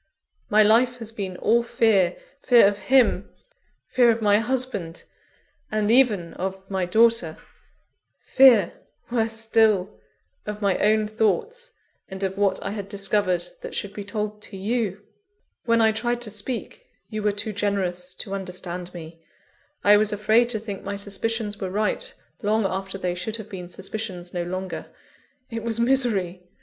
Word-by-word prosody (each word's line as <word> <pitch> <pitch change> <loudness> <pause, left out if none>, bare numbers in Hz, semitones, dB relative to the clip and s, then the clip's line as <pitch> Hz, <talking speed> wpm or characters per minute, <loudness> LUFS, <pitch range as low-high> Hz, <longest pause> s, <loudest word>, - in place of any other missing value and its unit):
My 215 +1 +5
life 240 +4 +4
has 225 -2 -7
been 195 -5 -5
all 235 +5 +3
fear 210 -6 +2 0.2
fear 240 -6 +6
of 205 0 -1
him; 240 -7 +3 0.6
fear 245 -2 +4
of 230 0 +2
my 205 -1 +4
husband, 230 -8 -3 0.7
and 215 0 +1
even 220 -9 +3
of 190 +1 -4
my 190 -2 -1
daughter; 220 -5 +3 0.9
fear, 245 -9 +6 0.4
worse 225 -2 0
still, 220 -3 +1 0.5
of 210 0 -4
my 200 -3 +1
own 215 0 +3
thoughts, 425 - -1 0.4
and 190 +1 -7
of 190 0 -1
what 200 -1 +1
I 195 - -3
had 200 -2 -6
discovered 195 -3 0 0.2
that - - -7
should 200 -1 -3
be 205 - -6
told 210 0 -4
to 200 - -10
you. 205 -1 -2 0.6
When 230 -1 +3
I 220 0 +5
tried 240 +2 -2
to 220 -3 -3
speak, 230 - -5 0.3
you 215 0 -3
were 210 0 +2
too 205 +1 -3
generous 185 -3 -2
to 195 - -6
understand 180 -2 -5
me 165 0 -10 0.6
I 205 0 +7
was 215 0 +1
afraid 215 +3 +3
to 225 -3 +1
think 205 -2 -6
my 200 +1 -4
suspicions 205 +1 -2
were 190 - -2
right, 215 - -1 0.3
long 215 0 +1
after 190 0 -3
they 180 -2 -2
should 195 +5 -4
have 220 -2 -8
been 180 -3 -8
suspicions 185 -1 -5
no 175 - -2
longer. 185 +2 -5 0.6
It 230 0 -4
was 230 0 -1
misery! 230 -8 +1
210 Hz, 160 wpm, -24 LUFS, 190-225 Hz, 0.9 s, I